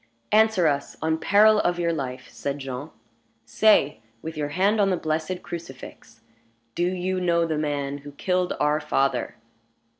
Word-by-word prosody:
"Answer 220 -4 +4
us, 140 -2 0
on 160 0 0
peril 210 +4 +5
of 175 -2 +1
your 170 -1 0
life," 130 -4 -5
said 140 0 -4
Jean. 135 +1 -6 0.6
"Say, 150 - +3 0.2
with 160 0 -6
your 150 -1 -2
hand 200 +7 +2
on 195 - +3
the 185 - +1
blessed 160 +3 -3
crucifix, 130 -7 -10 0.5
do 175 +6 0
you 185 0 -2
know 170 -1 +2
the 160 -2 -2
man 145 -2 -2
who 145 0 -11
killed 180 +4 -1
our 150 +1 +2
father?" 135 -4 -1
160 Hz, 155 wpm, -24 LUFS, 145-185 Hz, 0.6 s, peril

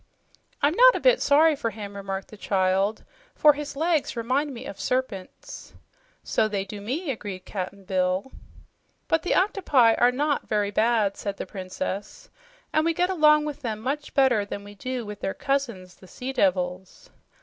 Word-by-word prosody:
"I'm 290 +2 +4
not - - +7
a - - -1
bit - - +4
sorry 305 +2 +5
for 230 -4 -2
him," 205 -2 -8
remarked 195 -1 -5
the - - -11
child, 195 +1 0 0.3
"for 300 -1 +6
his 290 -1 -6
legs 315 -4 0
remind 260 +6 0
me 240 - -8
of 200 - -8
serpents." 255 - -4 0.5
"So 215 - +1
they 200 -2 -2
do 205 +1 -8
me," 275 - -3
agreed 200 -6 -7
Cap'n 195 0 -6
Bill. 185 +5 -1 0.8
"But 325 - +2
the 355 - 0
octopi 295 - +3
are 245 +2 +4
not 290 +3 -1
very 205 -1 0
bad," 215 -2 +2
said 200 -1 -4
the - - -5
Princess, 195 - -6 0.4
"and 310 - +3
we 330 0 +1
get 360 +3 +1
along 300 -3 +5
with 295 -1 -5
them 220 -5 -3
much 280 +6 -4
better 260 -6 +4
than 200 0 -6
we 205 0 -11
do 250 +3 -5
with 210 -1 -8
their 195 - -3
cousins, 235 -10 -2
the 185 - -17
sea 255 +8 -6
devils." 185 -3 -1
230 Hz, 175 wpm, -25 LUFS, 200-290 Hz, 0.8 s, not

